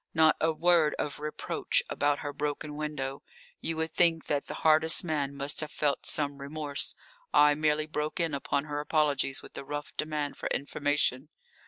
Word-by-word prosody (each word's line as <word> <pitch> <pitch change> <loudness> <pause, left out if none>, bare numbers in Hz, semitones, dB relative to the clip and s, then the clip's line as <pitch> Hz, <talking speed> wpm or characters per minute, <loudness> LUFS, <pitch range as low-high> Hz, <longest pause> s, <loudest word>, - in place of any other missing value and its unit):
Not 160 -1 +5
a 160 - +3
word 165 -1 +3
of 145 - -3
reproach 150 0 0
about 145 0 +1
her 145 - -3
broken 150 +1 -3
window. 145 -2 -4 0.4
You 165 -1 -2
would 160 0 -1
think 165 -2 +3
that 145 -1 -1
the - - -4
hardest 160 +1 +5
man 145 -4 -1
must 140 +1 -1
have 155 - -1
felt 145 -2 -1
some 145 -2 -1
remorse. 145 0 -3 0.4
I 150 0 +6
merely 155 0 +1
broke 155 +1 -3
in 165 -3 0
upon 140 0 0
her 145 -1 -4
apologies 145 -3 +1
with - - -13
a - - -7
rough 145 +1 -6
demand 150 -2 -2
for - - -3
information. 145 -1 0
150 Hz, 175 wpm, -29 LUFS, 145-155 Hz, 0.4 s, I